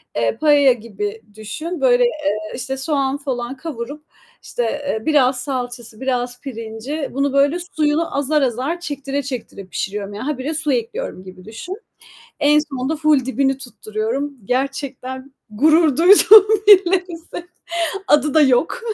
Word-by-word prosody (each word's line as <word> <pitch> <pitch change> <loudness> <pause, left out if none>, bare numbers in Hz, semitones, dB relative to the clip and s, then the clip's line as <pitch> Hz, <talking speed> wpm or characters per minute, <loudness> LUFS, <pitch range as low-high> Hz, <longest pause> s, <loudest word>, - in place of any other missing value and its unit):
Eee, 115 -1 0
paella 290 -3 +5
gibi 215 -2 -6
düşün. 310 - -6
Böyle, - - +4
eee, 215 - -2
işte, 265 +2 -4
soğan 275 -1 -1
falan 260 -2 -4
kavurup, 290 0 -7 0.4
işte, 245 - -3
eee, 235 -2 -3
biraz 265 -4 +3
salçası, 245 -4 -5
biraz 250 -2 -2
pirinci, 245 +4 -5
bunu 275 +1 -1
böyle 280 +4 +3 0.2
suyunu 305 0 0
azar 290 +1 +1
azar 265 +7 -1
çektire 285 -3 -4
çektire 245 -7 -7
pişiriyorum. 200 +2 -5
Yani, 210 - -6
habire 290 +1 -3
su 305 -2 -1
ekliyorum 245 - -4
gibi 185 -1 -13
düşün. 360 - -8 0.6
En 295 +1 +5
sonunda 290 0 -2
full 300 -4 +2
dibini 270 0 0
tutturuyorum. 245 +3 -4
Gerçekten 260 +1 -4 0.2
gurur 305 +5 +3
duyduğum 405 +4 +8 0.2
bilinsin, 360 -3 +3 0.6
adı 295 -3 +3
da 315 - +5
yok. 270 - +2
275 Hz, 135 wpm, -19 LUFS, 245-305 Hz, 0.6 s, duyduğum